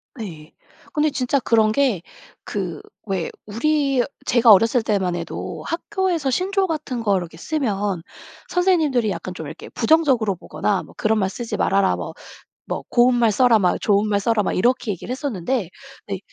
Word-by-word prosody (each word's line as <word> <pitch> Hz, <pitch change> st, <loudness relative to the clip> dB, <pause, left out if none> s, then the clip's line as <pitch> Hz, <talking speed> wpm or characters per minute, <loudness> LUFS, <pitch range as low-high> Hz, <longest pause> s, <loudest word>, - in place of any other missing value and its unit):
네. 165 Hz, -, -8 dB, 0.4 s
근데 305 Hz, 0 st, +2 dB
진짜 265 Hz, 0 st, 0 dB
그런 220 Hz, -3 st, +3 dB
게 240 Hz, -7 st, +1 dB, 0.4 s
그 180 Hz, -6 st, -4 dB, 0.2 s
왜 190 Hz, -5 st, -2 dB, 0.2 s
우리 275 Hz, +3 st, +1 dB, 0.2 s
제가 240 Hz, -2 st, +6 dB
어렸을 225 Hz, +4 st, +5 dB
때만 190 Hz, -5 st, 0 dB
해도 170 Hz, -1 st, -5 dB
학교에서 350 Hz, -4 st, -1 dB
신조어 380 Hz, +6 st, +1 dB
같은 295 Hz, -7 st, -3 dB
거를 200 Hz, -5 st, +1 dB
이렇게 165 Hz, -1 st, -11 dB
쓰면 205 Hz, -, -2 dB, 0.5 s
선생님들이 320 Hz, -, +2 dB
약간 185 Hz, -1 st, -4 dB
좀 160 Hz, -4 st, -7 dB
이렇게 -, -, -9 dB
부정적으로 250 Hz, -, +2 dB
보거나 200 Hz, +3 st, -2 dB
뭐 -, -, -15 dB
"그런 220 Hz, 0 st, +1 dB
말 190 Hz, -, +1 dB
쓰지 235 Hz, +3 st, -4 dB
말아라." 195 Hz, 0 st, +2 dB
뭐, -, -, -6 dB, 0.5 s
뭐 -, -, -4 dB
"고운 245 Hz, +1 st, +4 dB
말 235 Hz, -3 st, +3 dB
써라." 235 Hz, 0 st, +4 dB
막 180 Hz, -3 st, +2 dB
"좋은 205 Hz, 0 st, +2 dB
말 200 Hz, -1 st, +2 dB
써라." 220 Hz, +1 st, +1 dB
막 -, -, -1 dB
이렇게 245 Hz, +4 st, +1 dB
얘기를 195 Hz, +6 st, -6 dB
했었는데 255 Hz, -, -2 dB, 0.4 s
근데 195 Hz, -2 st, -3 dB
225 Hz, 335 characters per minute, -22 LUFS, 195-275 Hz, 0.5 s, 제가